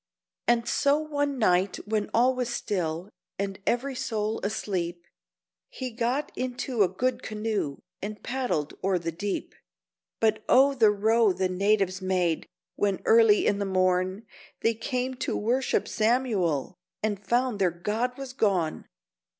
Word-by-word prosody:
And 235 0 +3
so 280 +1 +3
one 290 -2 -1
night 185 -4 +2
when 215 -1 -1
all 250 +3 +4
was 250 -1 -2
still 180 -5 -2 0.3
and 195 -1 -3
every 265 +3 0
soul 225 -4 -2
asleep, 175 -4 -2 0.6
He 255 -1 -5
got 245 +5 -1
into 250 -2 -2
a 195 - +6
good 250 +8 -1
canoe 210 -9 -2 0.2
and 210 +1 -6
paddled 245 - -1
o'er 190 -1 +2
the 165 -1 -3
deep, 200 +5 -4 0.7
But 220 -1 +2
oh 275 +2 +6
the 230 -5 +5
row 215 0 +3
the 185 0 0
natives 195 0 +1
made, 180 -3 0 0.3
when 200 -2 0
early 225 -2 +6
in 205 - +2
the - - 0
morn 185 +2 +1 0.4
They 230 - +3
came 250 +3 -2
to - - -2
worship 245 +5 +1
Samuel, 215 - +1 0.3
and 205 -2 -1
found 240 +1 +1
their 185 -2 +4
god 215 +9 -2
was 270 -2 -7
gone! 190 - 0
215 Hz, 140 wpm, -27 LUFS, 190-245 Hz, 0.7 s, a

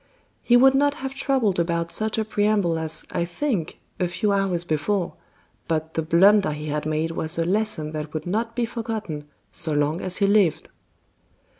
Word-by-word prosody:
He 245 - +5
would 265 +2 +6
not 285 +1 +2
have 270 0 -5
troubled 265 -9 +1
about 170 0 -1
such 220 0 -2
a 220 - 0
preamble 205 -6 +1
as 160 -1 -2
"I - - 0
think" 175 - -2 0.2
a 180 - +1
few 200 +4 -1
hours 195 -4 0
before, 175 +4 -1 0.5
but 160 -1 -2
the 160 - 0
blunder 190 +2 +4
he 150 +1 -6
had 150 +1 -2
made 155 +1 -1
was 160 +1 -2
a 165 - +1
lesson 195 -5 0
that 155 -1 -5
would 155 -1 -5
not 225 +5 -2
be 240 -1 +1
forgotten 220 -10 -5 0.3
so 160 -2 0
long 150 +3 0
as 185 -1 -3
he 200 - +2
lived. 200 -5 +2
180 Hz, 180 wpm, -24 LUFS, 160-215 Hz, 0.5 s, would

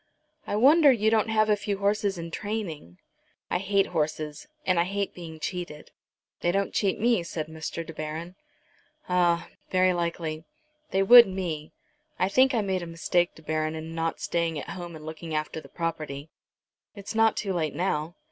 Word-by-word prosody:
"I - - -1
wonder 285 +6 +7
you 220 -3 +2
don't 220 0 +2
have 215 -1 +3
a 210 - +4
few 205 -1 -3
horses 200 -1 +1
in 170 0 -6
training." 170 - -5 0.5
"I 180 - +1
hate 195 +1 +2
horses, 155 - -3 0.2
and 185 -2 +3
I - - +5
hate 200 +1 -2
being 165 -3 -9
cheated." 175 -3 -5 0.5
"They 175 - +1
don't 195 +2 0
cheat 195 -2 +1
me," 230 -3 +3
said 165 -2 -4
Mr. 160 +1 -6
De 165 - -8
Baron. 155 +3 -5 0.7
"Ah; 175 -2 +2 0.2
very 185 0 +3
likely. 170 -2 -3 0.5
They 195 0 +2
would 240 +3 +10
me. 170 -5 -4 0.5
I 185 - +1
think 260 +5 +4
I 225 - +2
made 190 -2 -1
a 170 - -6
mistake, 175 +1 0
De 160 - -15
Baron, 155 0 -1
in 160 +1 -6
not 165 0 -2
staying 170 -2 -1
at 145 - -6
home 175 -3 -7
and 155 -1 -10
looking 160 0 -6
after 155 +1 -2
the - - -15
property." 155 -3 -4 0.6
"It's 200 +1 -7
not 225 0 +3
too 195 -2 -1
late, 160 -4 -1
now." 170 -2 -1
175 Hz, 180 wpm, -27 LUFS, 160-200 Hz, 0.7 s, would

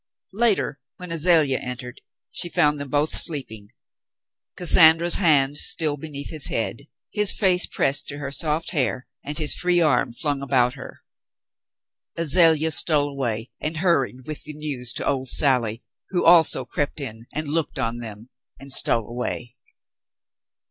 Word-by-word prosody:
Later, 205 -9 0 0.2
when 180 -1 -8
Azalea 160 -5 +3
entered, 125 0 -8 0.3
she 175 - -4
found 150 -2 +1
them 140 -1 -5
both 150 +2 0
sleeping, 110 - 0 0.9
Cassandra's 170 -1 +5
hand 145 -4 +3
still 150 0 +1
beneath 145 -1 -6
his 155 -3 +1
head, 115 +5 -4 0.2
his 210 -2 +2
face 185 -3 +1
pressed 135 +1 -1
to 145 - -3
her 140 -1 -6
soft 155 +2 -1
hair 130 -5 -2 0.2
and 145 +1 -4
his 155 -2 +3
free 180 0 +1
arm 155 -7 +1
flung 140 +3 -3
about 125 -3 +1
her. 135 -2 -12 1.2
Azalea 165 -1 +3
stole 150 -2 +2
away 120 -5 -4
and 155 +1 -4
hurried 135 -7 -1
with 155 -1 -6
the 150 - -7
news 145 -5 -2
to - - -4
old 130 -2 -2
Sally, 120 -5 +2 0.3
who 180 - -1
also 165 -6 +5
crept 145 +4 -4
in 115 -4 -7
and 155 0 -5
looked 155 +1 -2
on 115 +1 -3
them 115 0 -9 0.3
and 135 +1 -10
stole 115 -5 +2
away. 120 0 -5
145 Hz, 150 wpm, -22 LUFS, 130-160 Hz, 1.2 s, Cassandra's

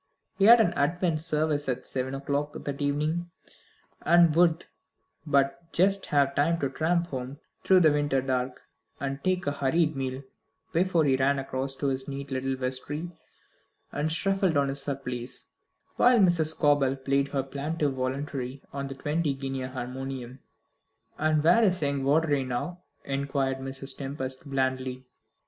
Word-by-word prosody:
He 195 - +5
had 235 +2 +9
an 200 -6 +3
Advent 165 +2 0
service 150 -3 0
at 125 - -2
seven 130 +1 -3
o'clock 145 +2 -2
that 140 0 -5
evening, 150 +4 -1 0.7
and 170 -2 +5
would 170 -1 +3 0.6
but 140 +3 +1
just 195 +2 +2
have 140 -2 +2
time 165 +4 +2
to 140 -2 0
tramp 170 +4 +1
home 130 0 -5 0.3
through 185 -1 +5
the 155 -3 +6
winter 145 -2 +1
dark, 130 -1 -2 0.4
and 135 0 -4
take 185 -1 0
a 145 - +1
hurried 150 +3 +1
meal, 130 0 -3 0.5
before 170 -2 +2
he 135 -2 +3
ran 140 +2 +2
across 135 0 -1
to 140 - -4
his 130 0 -2
neat 140 0 -6
little 130 0 -1
vestry 130 +6 -3 0.8
and 150 +2 -1
shuffled 190 -1 +1
on 140 -1 +2
his 140 +1 -1
surplice, 130 -3 -4 0.5
while 245 0 +5
Mrs. 175 -6 +4
Scobel 145 -4 +2
played 140 +1 0
her 140 -1 -1
plaintive 145 +2 -2
voluntary 130 0 -4
on 140 0 -3
the 135 - -7
twenty 150 +1 -1
guinea 135 -1 -4
harmonium. 130 0 -6 0.8
"And 155 -1 +2
where 175 +8 +5
is 185 -5 +3
young 140 -1 0
Vawdrey 145 0 +2
now?" 130 +8 -4 0.2
inquired 135 -1 -1
Mrs. 135 0 -4
Tempest 135 0 -5
blandly. 130 -1 -1
140 Hz, 150 wpm, -27 LUFS, 135-160 Hz, 0.8 s, had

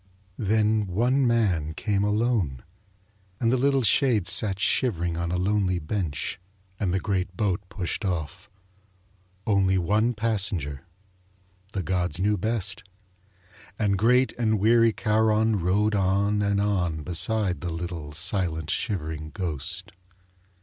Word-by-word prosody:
Then 110 0 +1
one 125 +8 +2
man 90 -10 +1
came 100 +1 0
alone. 105 - 0 0.8
And 115 0 +2
the - - +4
little 135 +1 +2
shade 115 -5 +3
sat 95 +1 +3
shivering 90 -8 +1
on 85 0 -2
a 90 - 0
lonely 95 -1 +1
bench 80 -4 -3 0.4
and 95 -4 0
the 95 - +1
great 95 -3 -2
boat 100 -4 0
pushed 95 +1 -4
off. 90 +1 -4 1.0
Only 95 -2 +2
one 105 +7 +1
passenger: 95 -9 -2 0.9
the 95 - -2
gods 90 +1 -1
knew 105 +3 +1
best. 105 -1 -2 1.0
And 105 -3 +1
great 125 +6 +3
and 110 -2 +2
weary 115 +2 +4
Charon 110 -1 +2
rowed 100 +5 +1
on 100 +1 +1
and 100 0 +1
on 90 -7 0
beside 95 +3 0
the 90 - -3
little, 85 -2 -5
silent, 80 0 -1
shivering 80 -7 -3
ghost. 85 +1 -4
100 Hz, 125 wpm, -25 LUFS, 90-110 Hz, 1.0 s, the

